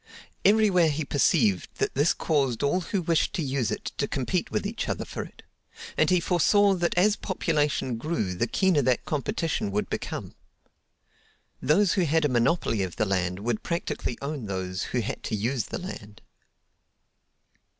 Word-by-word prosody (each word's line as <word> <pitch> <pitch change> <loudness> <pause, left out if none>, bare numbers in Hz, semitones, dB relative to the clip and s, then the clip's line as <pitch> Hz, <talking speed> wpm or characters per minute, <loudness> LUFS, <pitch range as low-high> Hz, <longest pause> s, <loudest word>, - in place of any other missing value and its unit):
Everywhere 200 -5 +5
he 150 0 -2
perceived 125 - +2
that - - -1
this 145 +5 +3
caused 140 -7 0
all 160 +6 +2
who 185 +1 -2
wished 165 -1 +1
to 165 - -1
use 135 -4 -1
it - - -4
to - - +1
compete - - -1
with - - -2
each - - -3
other - - -2
for - - -5
it; - - -11 0.5
and 155 - +3
he 180 - +4
foresaw 195 +4 +3
that 175 -2 -1
as 205 +3 +4
population 150 - -1
grew 115 - -2
the 105 +7 -1
keener 185 - +2
that 125 -2 +1
competition 160 - -1
would 105 +1 -2
become. - - -4 1.3
Those 180 +5 +3
who 185 -4 +2
had 160 0 +2
a - - +2
monopoly 120 - +1
of 95 -2 -3
the 110 - +1
land 90 -1 -1
would 115 0 -1
practically 170 -7 -3
own 140 -6 -4
those 95 -1 -3
who 125 - -1
had 115 +5 -4
to 110 - -3
use 115 +2 -1
the - - -5
land. 105 - -9
145 Hz, 170 wpm, -26 LUFS, 115-175 Hz, 1.3 s, Everywhere